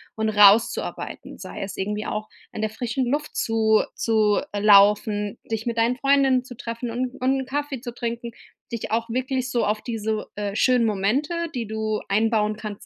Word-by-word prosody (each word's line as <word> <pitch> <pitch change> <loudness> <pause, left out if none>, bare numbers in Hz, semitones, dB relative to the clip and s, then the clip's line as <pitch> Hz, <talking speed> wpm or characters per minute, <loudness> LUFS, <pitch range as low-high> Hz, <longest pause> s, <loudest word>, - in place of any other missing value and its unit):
und 220 0 0
rauszuarbeiten, 210 +2 +3
sei - - -7
es 195 -1 -6
irgendwie 210 +2 -3
auch 215 0 -4 0.2
an 215 - -5
der 215 - 0
frischen 240 +3 -2
Luft 290 +4 -2
zu 220 -1 +3
zu, 215 -2 +2
äh, 205 - -1
laufen, 205 +1 +4
dich 225 0 -2
mit 235 -1 -2
deinen 235 +2 +2
Freundinnen 270 -1 +3
zu 250 -1 -11
treffen 230 0 -5
und 250 +2 -3
und 265 +1 +2
'n - - -6
Kaffee 285 -2 -3
zu 240 -1 -6
trinken, 235 0 -4 0.4
dich 230 -2 -5
auch 230 +1 0
wirklich 255 +1 -2
so 240 -3 +1
auf 210 +1 -1
diese, 220 -2 -3
äh, 205 -1 -3
schönen 245 +1 +3
Momente, 275 - 0
die 240 -2 -2
du 220 0 -2
einbauen 215 0 +1
kannst 210 -2 -7
225 Hz, 180 wpm, -24 LUFS, 215-250 Hz, 0.4 s, laufen